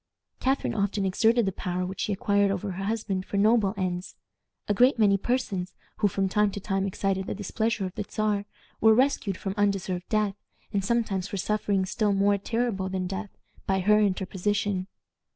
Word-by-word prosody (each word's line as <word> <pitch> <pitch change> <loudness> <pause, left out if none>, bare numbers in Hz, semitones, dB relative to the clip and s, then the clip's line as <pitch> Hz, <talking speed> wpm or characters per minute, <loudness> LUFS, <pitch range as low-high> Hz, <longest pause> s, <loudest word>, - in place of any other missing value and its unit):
Catharine 265 +1 0
often 200 -1 0
exerted 225 +4 +3
the 195 - 0
power 180 0 -3
which 190 +1 -6
she - - -1
acquired 200 0 +2
over 195 0 -2
her 190 +2 -4
husband 205 -3 -1
for 200 - -4
noble 210 -1 +3
ends. 180 -1 -3 0.5
A 205 - +2
great 250 +5 +4
many 205 -3 +5
persons, 195 -4 -2 0.2
who 205 - +3
from 195 0 0
time 210 +2 +2
to - - -4
time 195 0 -1
excited 190 0 -1
the - - -3
displeasure 220 +1 -1
of 185 - -5
the - - -3
Czar, 210 -1 0 0.3
were 220 0 +6
rescued 245 -7 +1
from 195 - -3
undeserved 195 -3 0
death, 210 -2 +1 0.4
and 200 -1 +1
sometimes 200 -4 0
from 200 - -5
sufferings 195 -1 0
still 210 -3 +1
more 200 +1 +3
terrible 225 -3 -1
than 185 -1 -2
death, 195 +3 -4 0.4
by 190 0 +2
her 210 +3 +4
interposition. 200 0 0
200 Hz, 180 wpm, -27 LUFS, 190-215 Hz, 0.5 s, were